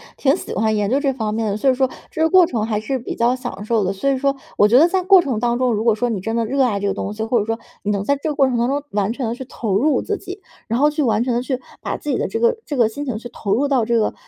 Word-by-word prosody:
挺 275 +2 +2
喜 - - -7
欢 220 +2 +1
研 205 -1 0
究 275 - +3
这 280 -2 +1
方 220 -5 -3
面 220 -1 -1
的， 200 - -1
所 270 - -1
以 - - +1
说 260 0 +1 0.2
这 320 - -4
个 320 - +4
过 370 -2 +6
程 230 -8 -2
还 210 -2 -1
是 255 +4 -3
比 235 - -6
较 240 +2 +2
享 245 -5 -7
受 220 -2 +1
的。 185 - 0
所 275 +8 0
以 - - +1
说 275 0 +1 0.2
我 205 - +7
觉 235 - +5
得 320 +5 +7
在 375 +1 0
过 380 0 +7
程 255 -7 -2
当 240 +1 0
中， 250 -2 +1
如 215 +1 -1
果 230 -2 +3
说 245 +3 -1
你 210 -6 -2
真 225 +3 -3
的 230 -1 0
热 270 +4 0
爱 210 -6 +1
这 200 - -1
个 - - 0
东 205 - -4
西， 220 - -3
或 230 +1 +1
者 210 - -1
说 225 0 -2 0.2
你 205 - -3
能 200 -1 -1
在 280 +7 +2
这 315 - -1
个 295 - -3
过 270 -2 +4
程 250 - -1
当 240 - +2
中 285 +2 -1
完 205 +1 0
全 250 +1 -3
地 225 - -2
去 260 - -7
投 220 -5 -3
入 290 0 +2
自 420 -1 -2
己， 370 +2 -9 0.3
然 230 +3 -1
后 295 +1 +4
去 300 +1 -2
完 230 -4 +2
全 250 -1 -1
地 240 - 0
去 255 0 -3 0.2
把 - - -3
自 295 - -4
己 - - 0
的 - - -1
这 225 - -3
个 235 - +3
这 290 - -5
个 235 -3 +4
心 285 +6 -6
情 240 -5 -3
去 240 - -8
投 200 -1 -1
入 285 +4 +1
到 255 -5 +2
这 235 0 +1
个 215 - +1
240 Hz, 375 characters per minute, -20 LUFS, 220-275 Hz, 0.3 s, 我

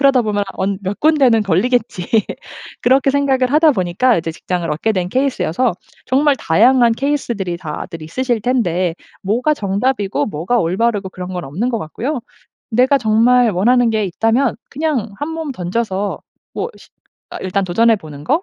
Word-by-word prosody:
그러다 275 -3 +4
보면 205 -2 -1
언 190 0 -2
몇 195 +1 -3
군데는 270 -8 +4
걸리겠지.' 205 0 0 0.7
그렇게 270 +2 +3
생각을 270 -2 +1
하다 310 0 +5
보니까 185 +6 +1
이제 165 0 -3
직장을 175 0 -3
얻게 160 +9 0
된 180 -2 -1
케이스여서 255 - 0 0.3
정말 280 +2 +3
다양한 235 +6 +4
케이스들이 235 -9 -2
다들 160 0 -7
있으실 240 +7 -2
텐데 185 -8 0 0.3
뭐가 240 +10 +1
정답이고 205 0 -1
뭐가 200 +6 -1
올바르고 200 +3 0
그런 180 0 -7
건 180 -1 -4
없는 185 - -2
것 230 - -1
같고요. 245 - -4 0.5
내가 255 +4 +3
정말 235 +1 +3
원하는 235 +5 +3
게 215 -2 0
있다면 225 +7 +1
그냥 270 -7 -1
한몸 320 0 -4
던져서 195 +1 -2 0.3
뭐 - - -3
시 - - -18 0.4
어 - - -5
일단 190 +1 -1
도전해 225 +6 +3
보는 150 -5 -11
거 320 - +1
225 Hz, 340 characters per minute, -17 LUFS, 185-255 Hz, 0.7 s, 하다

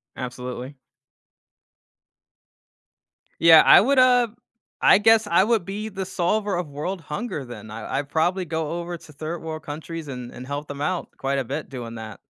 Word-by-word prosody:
Absolutely. 125 +2 -6 2.6
Yeah, 165 -1 +9
I - - +9
would, 270 +5 +3
uh, 250 -1 +5 0.5
I - - +7
guess 220 +1 +4
I 185 -1 +4
would 220 -3 +1
be 210 +3 -5
the 190 -1 -5
solver 200 +3 0
of 175 -3 -2
world 160 +6 -4
hunger 150 - -5
then. 110 -3 -10
I 115 +4 -3
I'd 140 0 -5
probably 175 +4 +1
go 160 +1 -3
over 175 0 -5
to 155 - -16
third 155 +4 -5
world 160 -1 -6
countries 160 +2 -7
and 125 -3 -7
and 125 +1 -10
help 145 +1 -4
them 145 0 -7
out 175 +3 -2
quite 135 0 -1
a - - -1
bit 115 - -5
doing 120 -3 -7
that. 110 -2 -8
160 Hz, 170 wpm, -24 LUFS, 135-190 Hz, 2.6 s, Yeah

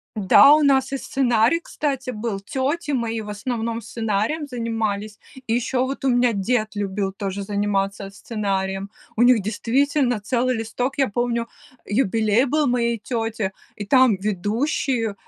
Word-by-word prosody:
Да, 215 +8 +7
у 305 - +2
нас 270 -2 +3
и 275 - -1
сценарий, 260 +2 +2
кстати, 275 -6 -3
был. 215 -3 -4
Тёти 280 +9 -2
мои 230 -4 -1
в 210 - -8
основном 230 +2 -3
сценарием 225 +7 -2
занимались, 220 -4 -3 0.3
и 225 - +1
ещё 250 +1 0
вот 275 +2 -5
у 265 - +4
меня 245 -1 +3
дед 215 +2 -1
любил 195 -1 -2
тоже 195 0 -4
заниматься 200 -1 -1
сценарием. 195 -2 -3 0.3
У 230 - 0
них 245 -3 +5
действительно 245 +4 +1
целый 250 +3 0
листок. 245 +5 -3
Я 270 -2 +3
помню, 235 +1 -1 0.4
юбилей 220 +1 +2
был 295 +2 +1
моей 235 -2 0
тёти, 225 -4 -1 0.3
и 205 - -5
там 255 -1 +4
ведущий 220 - -1
230 Hz, 145 wpm, -22 LUFS, 205-255 Hz, 0.4 s, Да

